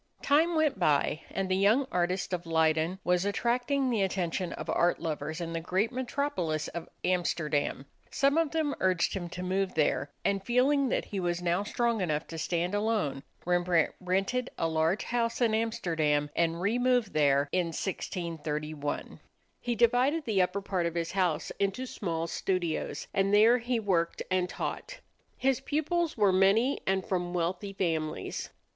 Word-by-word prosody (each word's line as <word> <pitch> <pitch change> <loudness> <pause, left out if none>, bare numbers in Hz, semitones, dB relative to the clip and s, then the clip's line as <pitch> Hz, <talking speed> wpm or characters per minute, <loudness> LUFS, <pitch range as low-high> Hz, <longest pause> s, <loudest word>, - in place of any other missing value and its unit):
Time 320 +4 +3
went 310 -9 +2
by, 155 -1 +2
and 195 -1 -2
the 185 - +1
young 210 +8 +3
artist 180 +1 0
of 175 -1 -3
Leyden 160 +2 +2
was 180 0 +2
attracting 245 +6 0
the 225 -4 +1
attention 180 -2 -1
of - - -7
art 175 0 +2
lovers 155 0 -3
in 165 -1 -4
the 165 - -1
great 185 +7 0
metropolis 250 - -2
of 170 0 -7
Amsterdam. 155 -6 0 0.2
Some 280 0 +2
of 325 -2 +2
them 310 -2 0
urged 185 -2 +2
him 175 -3 -4
to 180 +1 -6
move 190 +1 -1
there; 145 -3 +1 0.2
and 200 -1 +1
feeling 260 +4 +2
that - - 0
he 200 - -4
was 175 -1 -1
now 175 +2 +1
strong 230 +1 0
enough 155 -3 -1
to 165 - -6
stand 175 +3 -1
alone, 205 -10 0 0.2
Rembrandt 175 -2 +2
rented 195 +8 0
a 165 - +1
large 160 +4 +1
house 235 -1 -1
in 235 -3 +2
Amsterdam 165 -10 0
and 170 0 +1
removed 245 +2 +1
there 140 -2 +3
in 180 -2 +1
1631. 155 -4 -4 0.4
He 240 -1 -2
divided 250 +7 +3
the 210 -5 +2
upper 180 +2 0
part 185 -3 -1
of 170 - -5
his 165 -1 -2
house 180 -5 0
into 200 +6 0
small 165 -9 -3
studios, 175 -1 -2
and 195 0 +2
there 225 +4 +6
he 240 0 -1
worked 180 -6 0
and 185 -1 +1
taught. - - -5 0.4
His 265 -1 +1
pupils 310 +4 -1
were 205 -3 +4
many 200 +8 +3
and 190 -1 +1
from 180 -3 -2
wealthy 180 +4 -2
families. 165 -5 -2
185 Hz, 165 wpm, -29 LUFS, 170-235 Hz, 0.4 s, there